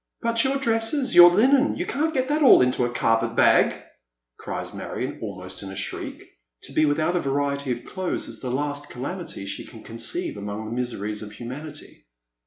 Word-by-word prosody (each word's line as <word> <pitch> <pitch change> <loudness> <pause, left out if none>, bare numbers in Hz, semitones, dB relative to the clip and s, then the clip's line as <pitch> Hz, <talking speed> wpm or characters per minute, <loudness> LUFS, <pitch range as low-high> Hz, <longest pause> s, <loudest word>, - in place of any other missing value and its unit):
" - - -54
But 230 0 +2
your 270 +1 +1
dresses, 240 +2 0
your 175 0 +10
linen, 260 +9 +4
you - - -3
can't 315 +3 0
get 260 -4 0
them 300 +2 +1
all 260 - +8
into 125 0 +1
that 120 0 -1
carpet 115 0 +1
bag," - - +4 0.6
cries - - -5
Marion, - - -5
almost 95 -3 -7
in 100 - -7
a 95 - -8
shriek. - - -5 0.4
To - - -6
be 155 - +3
without 155 +4 +1
a - - +2
variety 140 0 -1
of 120 0 -4
clothes 185 -1 -3
is - - -10
the 130 - -5
last 145 +2 -2
calamity 140 - -6
she 100 - -5
can 110 - -13
conceive 315 - -4
among 105 +2 -5
the 110 - -5
miseries 105 -4 -3
of 105 -1 -8
humanity. 130 - -9
140 Hz, 195 wpm, -24 LUFS, -, 0.6 s, your